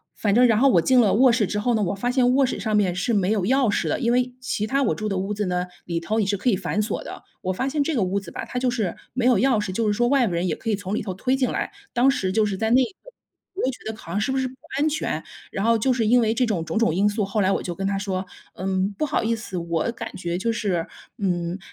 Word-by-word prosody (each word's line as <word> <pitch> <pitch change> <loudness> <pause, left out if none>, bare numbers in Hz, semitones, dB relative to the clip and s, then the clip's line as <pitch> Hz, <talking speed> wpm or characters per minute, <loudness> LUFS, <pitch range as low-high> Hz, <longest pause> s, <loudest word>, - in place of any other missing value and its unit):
反 205 -2 0
正 245 +3 +6
然 225 -2 +3
后 275 +4 +5
我 175 -8 +4
进 255 +9 +4
了 215 -4 +4
卧 255 +3 +6
室 230 -2 +2
之 210 +2 -2
后 235 +3 +1
呢， 215 - +1
我 185 - 0
发 200 +5 -2
现 250 0 +3
卧 275 +1 +4
室 245 - -3
上 215 +1 -1
面 190 -4 +2
是 180 +6 -1
没 195 -3 +2
有 205 -4 +1
钥 260 0 +3
匙 - - 0
的， - - 0
因 235 -2 +1
为 250 0 +1
其 245 -4 -2
它 275 +5 0
我 250 - +1
住 215 - -3
的 200 - -1
屋 200 +2 -2
子 210 - -1
呢， 180 0 -1 0.2
里 170 -1 -2
头 215 +6 -1
也 215 - +2
是 200 +1 0
可 245 +6 0
以 205 - +3
反 190 +2 -1
锁 210 - -3
的。 - - -9 0.2
我 185 - -1
发 260 +8 -1
现 290 +1 0
这 320 - -1
个 235 - +1
屋 190 +1 0
子 190 -4 -11
吧， - - -5
它 - - -6
就 250 0 +1
是 215 -8 -2 0.2
没 245 0 -1
有 250 - +5
钥 255 -4 +3
匙， 205 - -3
就 220 +4 -1
是 210 - +2
说 240 +3 +1
外 270 -1 +3
部 180 - -3
人 170 +2 0
也 170 - 0
可 225 - -3
以 - - +2
从 200 0 -4
里 - - -2
头 195 -2 -4
推 255 +8 0
进 260 -2 0
来， - - -2 0.2
当 250 +2 +4
时 190 -9 0
就 215 +3 +2
是 205 -2 -1
在 220 +2 0
那 - - +6
个 245 - -3 0.7
我 390 - -3
就 260 - +2
觉 220 -3 -6
得 - - -10
好 170 - -10
像 205 - 0
是 240 - 0
不 265 - 0
是 260 - 0
不 255 - -10 0.3
安 300 - +3
全。 290 - -2 0.3
然 195 - -2
后 230 0 +4
就 255 +4 +1
是 235 -3 0
因 245 +3 +5
为 220 -1 +2
这 250 +2 +2
种 205 -8 -1
种 190 - -3
种 230 -7 +2
因 195 +4 +2
素， 210 0 -1
后 200 +2 -1
来 190 0 +2
我 - - 0
就 175 - -3
跟 195 +3 -3
他 200 - 0
说： 190 -1 -3 0.3
“嗯， 190 +1 -1
不 305 - 0
好 280 - 0
意 230 +1 +1
思， 215 -4 -6
我 170 +2 -1
感 230 -1 -7
觉 175 -1 -3
就 230 +5 0
是， 190 -7 -1 0.3
嗯， 175 -2 -1
215 Hz, 340 characters per minute, -23 LUFS, 190-245 Hz, 0.7 s, 正